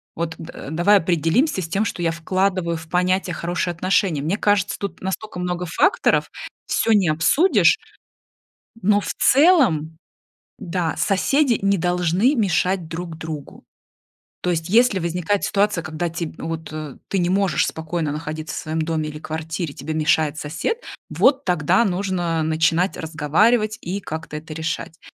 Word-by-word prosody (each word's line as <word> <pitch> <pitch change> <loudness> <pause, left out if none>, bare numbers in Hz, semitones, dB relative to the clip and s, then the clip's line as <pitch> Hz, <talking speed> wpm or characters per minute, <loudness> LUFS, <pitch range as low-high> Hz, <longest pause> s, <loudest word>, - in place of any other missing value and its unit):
Вот, 165 -1 -3
д 165 -4 -9
давай 175 +6 +4
определимся 180 - +1
с 165 - -4
тем, 200 +5 0
что 180 - -4
я 165 -1 +1
вкладываю 185 +1 0
в 160 0 -9
понятие 180 +1 +1
"хорошие 175 +1 -2
отношения". 180 -3 +1
Мне 165 +7 0
кажется, 205 -2 +1
тут 200 - -5
настолько 190 +1 -4
много 180 0 -2
факторов, 385 - +2 0.4
всё 225 - +1
не 200 -5 +4
обсудишь, 220 - +4 1.0
но 205 +2 +3
в - - -4
целом, 250 - +4 0.6
да, 170 -2 -2
соседи 245 +5 +2
не 200 0 +2
должны 180 - +2
мешать 185 -4 +1
друг 165 -1 -6
другу. 160 -3 -8 0.8
То 180 - -1
есть 165 -1 -2
если 220 0 +4
возникает 175 +3 -1
ситуация, 200 -3 +1
когда 160 +2 -3
те 165 0 -4
вот 160 0 -5 0.4
ты 195 - -1
не 175 -1 +1
можешь 195 -1 +2
спокойно 160 -1 -3
находиться 155 0 -5
в - - -5
своем 160 +1 -3
доме 155 -1 -1
или 150 - -7
квартире, 160 0 -4
тебе 155 +4 -5
мешает 155 -1 +1
сосед, 155 - -3 0.3
вот 275 +1 +3
тогда 180 +6 +2
нужно 175 -4 -1
начинать 160 +3 +1
разговаривать 205 +9 +1
и 190 +4 -4
как-то 160 -3 -6
это 155 +1 -7
решать. 165 0 -4
175 Hz, 150 wpm, -21 LUFS, 160-195 Hz, 1.0 s, давай